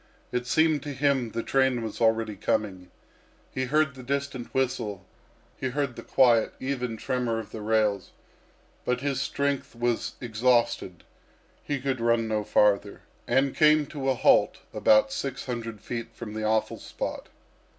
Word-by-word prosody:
It 125 0 -2
seemed 155 +1 +3
to 145 0 -5
him 135 -3 +1
the 115 +1 -4
train 130 -3 +2
was 110 0 -6
already 110 -1 +2
coming. 95 -2 -2 0.6
He 130 - -2
heard 150 +1 +2
the 130 - -10
distant 140 -1 -3
whistle; 115 -7 -2 0.5
he 130 - -3
heard 140 -1 -2
the - - -7
quiet, 120 -4 +3
even 125 -4 -3
tremor 120 -1 -1
of 110 -1 -6
the 110 - -7
rails; 105 -3 +1 0.7
but 125 0 -1
his 140 -1 -1
strength 140 -2 -2
was 120 0 -1
exhausted, 120 -6 +1 0.6
he 145 -1 -2
could 130 -2 -2
run 115 -1 +2
no 110 -1 -1
farther, 100 -1 +2 0.3
and 135 0 +2
came 155 -1 +5
to 135 -1 -3
a 130 - +2
halt - - +4 0.2
about 110 0 +4
six 135 -1 -4
hundred 115 -4 -5
feet 115 -2 -5
from 110 -3 -7
the 110 0 -4
awful 110 0 0
spot. - - -5
120 Hz, 155 wpm, -27 LUFS, 110-135 Hz, 0.7 s, came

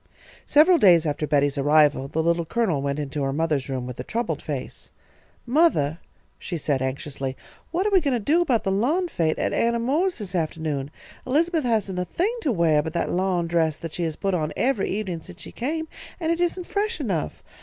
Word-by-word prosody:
Several 325 +4 +6
days 175 -5 +6
after 150 0 -1
Betty's 145 -1 +2
arrival, 145 -1 +4
the 160 +3 -1
Little 170 +1 +2
Colonel 175 -5 0
went 140 0 -2
into 145 0 -3
her 135 0 0
mother's 150 -2 -1
room 130 -2 -3
with 125 -1 -8
a - - -3
troubled 235 - -2
face. - - -6 0.6
"Mothah," 235 - +2 0.4
she 175 - -4
said, 145 -3 -1
anxiously, 135 0 -3 0.3
"what 355 +4 -1
are 420 - +1
we 380 -2 +5
goin' 280 -4 0
to - - 0
do 300 +11 +2
about 255 -10 +1
the 195 - 0
lawn 290 - +1
fête 165 - 0
at - - -1
Anna 235 0 +2
Moore's 300 +11 0
this 200 -5 -6
afternoon? 155 -5 -2 0.4
Elizabeth 320 +3 +1
hasn't 205 -6 0
a 180 - -1
thing 385 - -1
to 290 - +1
weah 165 -7 +3
but 160 +1 -5
that 170 - -1
lawn 180 -1 0
dress 165 -2 +1
that 165 -2 -7
she - - -4
has 160 -2 -1
put 195 -1 -1
on 155 -4 -1
every 245 -6 +1
evenin' 190 -5 -3
since - - -12
she - - -9
came, 320 +6 -3 0.3
and 325 -2 0
it 335 - 0
isn't 355 +1 0
fresh 420 +3 -2
enough. 190 - -3
180 Hz, 210 wpm, -24 LUFS, -, 0.6 s, Several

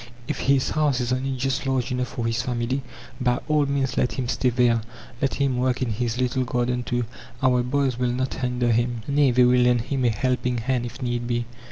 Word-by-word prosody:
If - - -3
his 135 -1 +2
house 150 -4 +1
is 125 0 0
only 130 +1 -2
just 135 +2 -1
large 130 -1 0
enough 125 0 -1
for 120 - -4
his 115 0 0
family, 125 +1 -1 0.4
by 125 -1 +2
all 150 -2 +2
means 140 -2 -1
let 125 - +1
him 130 -2 -2
stay 125 - +1
there. 120 -1 +3 0.4
Let 135 - +1
him 135 -3 +1
work 130 0 +1
in 120 - -1
his 115 +2 -2
little 130 +1 +1
garden, 125 0 0
too; 120 0 -1 0.4
our 125 -1 +4
"boys" 130 0 0
will 125 -1 +1
not 130 +2 -1
hinder 125 -1 0
him 120 0 0
nay, 140 -1 +3
they 125 0 +4
will 125 0 +5
lend 125 -1 +4
him 130 +2 -2
a - - +5
helping 125 +2 0
hand 120 +1 -1
if 120 - -8
need 120 -1 -2
be. 120 -1 -1
125 Hz, 220 wpm, -24 LUFS, 120-130 Hz, 0.4 s, will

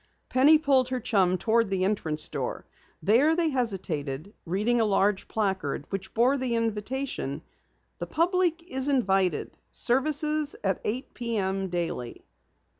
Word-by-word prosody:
Penny 285 +5 +6
pulled 270 -4 +2
her 255 -1 -1
chum 195 -6 +2
toward 230 +2 +2
the 190 -1 0
entrance 160 -7 0
door. - - -4 0.4
There 255 - +4
they 335 -1 +1
hesitated, 185 - -3
reading 215 +7 +1
a - - +4
large 200 -1 +1
placard 190 -10 -2
which 195 -1 -5
bore 255 +5 +3
the 250 -2 -1
invitation: 230 - -2 0.6
_The - - -5
Public 345 0 +1
Is 265 -6 -1
Invited. 195 -9 +1 0.2
Services 300 +3 0
at 190 -3 0
eight 245 +5 -3
p.m. 195 -5 -2
daily. 170 -9 -4
225 Hz, 130 wpm, -27 LUFS, 190-265 Hz, 0.6 s, Penny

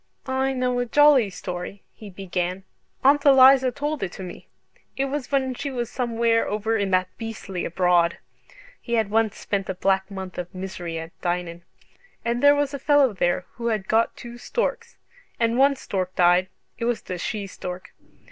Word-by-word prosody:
"I 265 0 0
know 250 -1 0
a 245 - -1
jolly 285 -4 +5
story," 180 +1 -7
he 215 - -11
began. 185 -1 -3 0.4
"Aunt 285 +2 +5
Eliza 265 -2 +7
told 295 +3 -3
it 185 -2 -4
me. 180 -2 -9 0.5
It 270 - +1
was 275 -1 -4
when 265 -2 +1
she 280 +3 -4
was 240 -3 -4
somewhere 230 -2 +1
over 215 +2 -1
in 200 -3 0
that 185 -1 0
beastly 215 -5 -5
abroad" 175 -1 +2 0.6
(he 235 - -5
had 220 -3 0
once 220 -1 +1
spent 195 -2 -3
a 190 - -2
black 190 +1 +1
month 190 -2 -7
of 180 +1 -7
misery 185 -3 -5
at 165 +1 -7
Dinan) 175 -1 -2 0.6
"and 235 +1 0
there 285 0 +7
was 290 -1 0
a 280 - -4
fellow 285 -3 +4
there 175 -1 0
who 235 -1 -3
had 215 -4 -1
got 225 +1 +1
two 240 0 -10
storks. 475 - -3 0.4
And 230 0 +2
one 280 +1 +5
stork 185 -7 -4
died 180 +1 +4 0.3
it 230 - -2
was 240 -1 -1
the 180 -1 -5
she 205 +3 -3
stork." 180 -1 -8
225 Hz, 175 wpm, -24 LUFS, 185-260 Hz, 0.6 s, Eliza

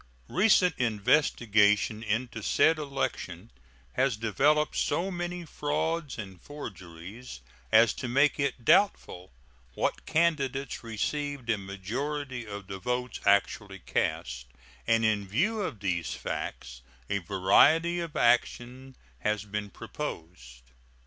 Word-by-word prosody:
Recent 185 -2 +4
investigation 110 -3 +2
into 115 +1 -2
said 160 +8 +3
election 115 - -4 0.4
has 130 - +1
developed 140 +8 +2
so 190 +3 0
many 175 0 -4
frauds 155 0 -2
and 95 -5 -8
forgeries 95 - -9 0.3
as 110 0 +6
to 130 - -5
make 140 +5 +3
it 135 -4 -2
doubtful 95 - +2 0.4
what - - -2
candidates 140 -5 0
received 130 +3 -2
a 110 - +1
majority 125 +7 -4
of 100 -1 -7
the 95 0 -7
votes 125 +2 -3
actually 100 0 +2
cast, - - -2 0.4
and 115 0 +3
in 105 -2 +1
view 205 - 0
of 115 - -4
these 85 -5 -1
facts - - -5 0.3
a 100 0 0
variety 100 - +4
of 165 -3 -5
action 125 +2 +1 0.2
has 105 - -1
been 105 0 -4
proposed. 65 -10 -8
115 Hz, 115 wpm, -28 LUFS, 100-145 Hz, 0.4 s, as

